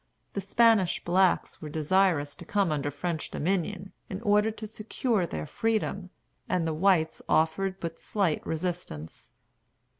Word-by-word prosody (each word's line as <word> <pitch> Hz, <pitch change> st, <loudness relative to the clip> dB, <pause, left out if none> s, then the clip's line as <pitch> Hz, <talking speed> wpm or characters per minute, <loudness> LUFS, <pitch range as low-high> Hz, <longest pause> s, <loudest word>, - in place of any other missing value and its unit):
The 200 Hz, -, -2 dB
Spanish 225 Hz, -5 st, +3 dB
blacks 185 Hz, +1 st, +2 dB
were 155 Hz, -, -6 dB
desirous 160 Hz, -1 st, +2 dB
to -, -, -9 dB
come 200 Hz, -5 st, +1 dB
under 145 Hz, -1 st, -1 dB
French 160 Hz, +3 st, -3 dB
dominion, 190 Hz, +3 st, -2 dB, 0.2 s
in 190 Hz, -, -4 dB
order 210 Hz, +1 st, +4 dB
to 220 Hz, 0 st, -7 dB
secure 215 Hz, -2 st, -1 dB
their 75 Hz, -, -4 dB
freedom, 210 Hz, -, -1 dB, 0.4 s
and 175 Hz, -2 st, +1 dB
the 160 Hz, -, 0 dB
whites 160 Hz, -1 st, +2 dB
offered 185 Hz, +5 st, +1 dB
but 165 Hz, -1 st, -5 dB
slight 195 Hz, -7 st, 0 dB
resistance. 160 Hz, -, -5 dB
180 Hz, 140 wpm, -28 LUFS, 160-200 Hz, 0.4 s, order